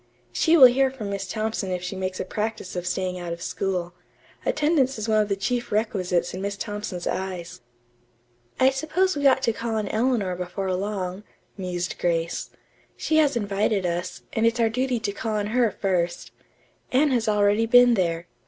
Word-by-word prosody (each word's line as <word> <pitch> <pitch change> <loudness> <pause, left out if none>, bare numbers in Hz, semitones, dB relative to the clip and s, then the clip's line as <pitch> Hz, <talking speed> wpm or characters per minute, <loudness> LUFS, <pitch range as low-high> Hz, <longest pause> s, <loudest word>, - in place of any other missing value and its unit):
"She 325 - +3
will 270 - +11
hear 265 +2 +5
from 225 -6 -6
Miss 195 -1 -3
Thompson 215 -1 -2
if 180 -1 -3
she 180 +2 -4
makes 185 0 -3
a - - -2
practice 215 -1 -4
of 180 0 -3
staying 180 0 -2
out 175 -1 -4
of 170 - -8
school. 180 -1 -2 0.5
Attendance 295 -4 +2
is 215 +1 -4
one 215 -1 +3
of 210 - -2
the 200 - +1
chief 240 +5 -2
requisites 185 -5 0
in 185 - -5
Miss 200 0 -3
Thompson's 205 -5 -5
eyes." 180 -6 -4 1.0
"I 260 +1 +5
suppose 315 +7 0
we 285 -1 +3
ought 265 0 +4
to 230 - +2
call 230 0 -3
on 215 -2 -1
Eleanor 220 -5 0
before 185 +1 -3
long," 190 0 -3 0.3
mused 180 -2 -4
Grace. 165 -1 -1 0.5
"She 315 - +1
has 290 -4 +4
invited 205 -2 0
us, 175 +1 -3
and 225 +1 +2
it's 230 +1 0
our 230 -1 +3
duty 250 +1 0
to 210 -2 -2
call 215 +2 -3
on 205 -1 0
her 245 -2 +3
first. 180 -4 -2 0.6
Anne 280 +3 +3
has 235 -3 +1
already 210 +2 +3
been 245 +1 +7
there. 170 -4 0
205 Hz, 185 wpm, -24 LUFS, 185-240 Hz, 1.0 s, will